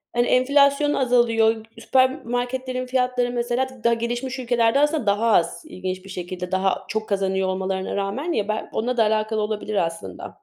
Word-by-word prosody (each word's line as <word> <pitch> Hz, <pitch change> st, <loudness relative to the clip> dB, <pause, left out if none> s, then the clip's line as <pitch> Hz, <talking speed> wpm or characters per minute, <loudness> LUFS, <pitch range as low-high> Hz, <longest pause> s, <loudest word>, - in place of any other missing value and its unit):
hani 240 Hz, 0 st, +2 dB
enflasyon 280 Hz, +3 st, +4 dB
azalıyor. 230 Hz, -3 st, +2 dB
Süpermarketlerin 255 Hz, 0 st, 0 dB
fiyatları 250 Hz, -1 st, 0 dB
mesela 240 Hz, +2 st, -1 dB, 0.2 s
daha 235 Hz, 0 st, +4 dB
gelişmiş 240 Hz, +3 st, -3 dB
ülkelerde 235 Hz, +1 st, +2 dB
aslında 295 Hz, -3 st, +1 dB
daha 210 Hz, +3 st, +2 dB
az 170 Hz, -, +2 dB
ilginç 185 Hz, -8 st, -5 dB
bir 195 Hz, -, -11 dB
şekilde 180 Hz, 0 st, -6 dB
daha 190 Hz, 0 st, 0 dB
çok 215 Hz, 0 st, -3 dB
kazanıyor 190 Hz, -1 st, 0 dB
olmalarına 190 Hz, 0 st, -2 dB
rağmen. 205 Hz, -, -2 dB
Ya 205 Hz, -9 st, -1 dB
belki 215 Hz, 0 st, -3 dB
onunla 245 Hz, +3 st, -2 dB
da 225 Hz, -, +5 dB
alakalı 215 Hz, 0 st, 0 dB
olabilir 210 Hz, 0 st, -3 dB
aslında. 165 Hz, -, -7 dB
230 Hz, 155 wpm, -23 LUFS, 200-255 Hz, 0.2 s, da